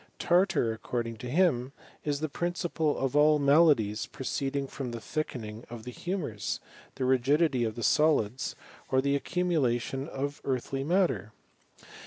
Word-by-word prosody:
Tartar 175 - +2
accord^ 120 +1 -3
ing 115 -1 -6
to 125 +2 -6
him, 140 -5 +2 0.3
is 145 -1 -1
the 155 - 0
principle 170 -1 -1
of 135 0 -1
all 150 +1 +6
the 145 - -2
maladies 140 -8 +4
pra^ 130 - -7
ceeding 140 0 -1
from 135 -2 -5
the 115 - -4
thickening 115 -4 -4
of 115 -2 -8
the 125 - -6
humours, 135 - -3 0.4
thll 130 -1 -1
rigidity 130 +1 +3
of 110 -2 -2
the 120 - -5
solids, 135 -6 +2 0.3
or 130 - +3
the 140 +1 +2
accumulation 140 -5 0
of 140 -1 -4
eartlij 135 +1 -2
matter. 175 - +1
135 Hz, 155 wpm, -29 LUFS, 120-155 Hz, 0.4 s, all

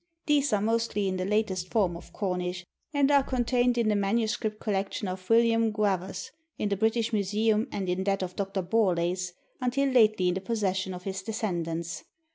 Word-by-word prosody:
These 290 -3 +2
are 210 - +2
mostly 225 -2 0
in 185 -1 -1
the 185 - -2
latest 195 -3 0
form 190 -5 +1
of 170 - -11
Cornish, 180 -2 -3 0.3
and 285 -1 +3
are 280 -1 +6
contained 245 -1 +1
in 235 -2 +2
the 210 - +3
MS. 215 +2 +1
collection 210 -2 -2
of 185 0 -6
William 230 -1 +4
Gwavas 195 -3 -1 0.3
in 210 - -1
the 200 - +1
British 225 +2 +1
Museum 215 +3 +1
and 195 -2 -3
in 180 +1 0
that 195 -1 +1
of 180 0 -5
Dr. 195 -1 -2
Borlase, 180 -3 +1 0.3
until 270 +2 +1
lately 215 -7 +4
in - - +1
the 190 - -3
possession 190 -3 -1
of 180 - -9
his 190 0 -4
descendants. 170 -6 -3
205 Hz, 180 wpm, -28 LUFS, 185-225 Hz, 0.3 s, are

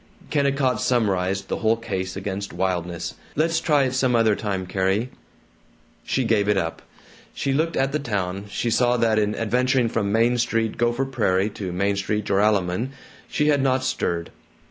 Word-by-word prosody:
Kennicott 140 -3 +1
summarized 100 -5 +1
the - - -2
whole 110 0 +2
case 95 -5 -4
against 100 0 -4
wildness: 90 -2 -2 0.2
"Let's 165 +2 +2
try 150 -4 +3
it 130 -1 -1
some 130 -1 +2
other 110 -2 +4
time, 95 -3 -3
Carrie." 95 +6 0 0.9
She 130 - 0
gave 110 -3 +2
it 105 - +3
up. 80 -3 -2 0.5
She 135 - -1
looked 160 +4 0
at 135 +1 +1
the 150 - 0
town. 100 -7 -3
She 115 +3 -2
saw 125 +1 +3
that 115 -2 +2
in 105 0 0
adventuring 125 +2 +1
from 105 -3 -1
Main 115 +3 +3
Street, 115 -2 0
Gopher 120 +3 +1
Prairie, 100 -6 +1
to 100 -3 -5
Main 100 +3 0
Street, 105 +1 -1
Joralemon, 100 +3 +1 0.4
she 150 0 +1
had 145 -2 +3
not 130 -1 +1
stirred. 85 -10 -2
110 Hz, 165 wpm, -23 LUFS, 95-130 Hz, 0.9 s, other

